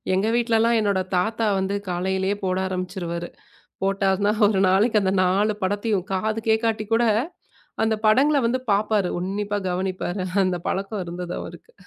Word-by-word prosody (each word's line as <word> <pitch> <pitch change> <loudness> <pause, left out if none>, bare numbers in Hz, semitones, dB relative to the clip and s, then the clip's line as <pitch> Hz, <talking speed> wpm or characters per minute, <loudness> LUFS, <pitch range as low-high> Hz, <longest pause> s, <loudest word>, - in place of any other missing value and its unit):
எங்க 195 +3 +1
வீட்டுலல்லாம் 230 -1 +2
என்னோட 200 -3 +1 0.2
தாத்தா 220 +4 0
வந்து 195 +1 -1
காலையிலேயே 190 +2 -1
போட 185 0 0
ஆரம்பிச்சுருவாரு. 180 -2 -4 0.6
போட்டார்னா 195 +1 +1 0.2
ஒரு 200 -2 +1
நாளைக்கு 210 +4 +3
அந்த 190 -1 +1
4 200 +4 +2
படத்தையும் 205 -1 -1
காதுகேக்காட்டி 220 +2 0
கூட 235 +1 +3 0.8
அந்தப் 220 0 0
படங்கள 280 +7 +4
வந்து 245 +2 +1
பாப்பாரு. 205 -2 +1
உன்னிப்பா 205 +3 -2
கவனிப்பாரு. 185 +1 -2 0.2
அந்தப் 180 -2 -2
பழக்கம் 195 +1 -2
இருந்தது 175 +1 -5
அவருக்கு. 485 - -11
200 Hz, 130 wpm, -23 LUFS, 185-220 Hz, 0.8 s, படங்கள